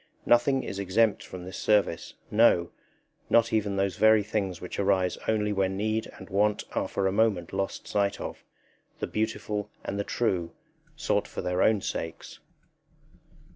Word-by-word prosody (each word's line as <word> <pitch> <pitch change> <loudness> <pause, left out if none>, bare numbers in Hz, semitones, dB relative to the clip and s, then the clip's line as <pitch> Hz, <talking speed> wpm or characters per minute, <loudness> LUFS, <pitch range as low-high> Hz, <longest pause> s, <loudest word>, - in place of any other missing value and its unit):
Nothing 125 +3 +3
is 100 - -5
exempt 100 +3 +2
from 90 -1 -9
this 95 0 -7
service, 105 -6 +1 0.2
no, 105 -6 +4 0.6
not 115 -1 +4
even 105 -2 +1
those 95 -2 0
very 110 -1 +5
things 100 -4 -2
which 90 - -6
arise 95 -2 +2
only 105 -1 +1
when 95 -1 0
need 110 +2 -1
and - - -11
want 105 +1 +1
are - - 0
for 100 - -2
a 95 - +2
moment 100 -5 +1
lost 95 0 -3
sight 100 -1 0
of - - -6 0.5
the - - -2
beautiful 105 -1 -2 0.2
and 100 - -3
the - - 0
true, 95 -7 -1 0.4
sought 150 -9 0
for - - -6
their 90 +1 0
own 110 -2 +4
sakes. 80 -2 -5
100 Hz, 160 wpm, -27 LUFS, 95-110 Hz, 0.6 s, very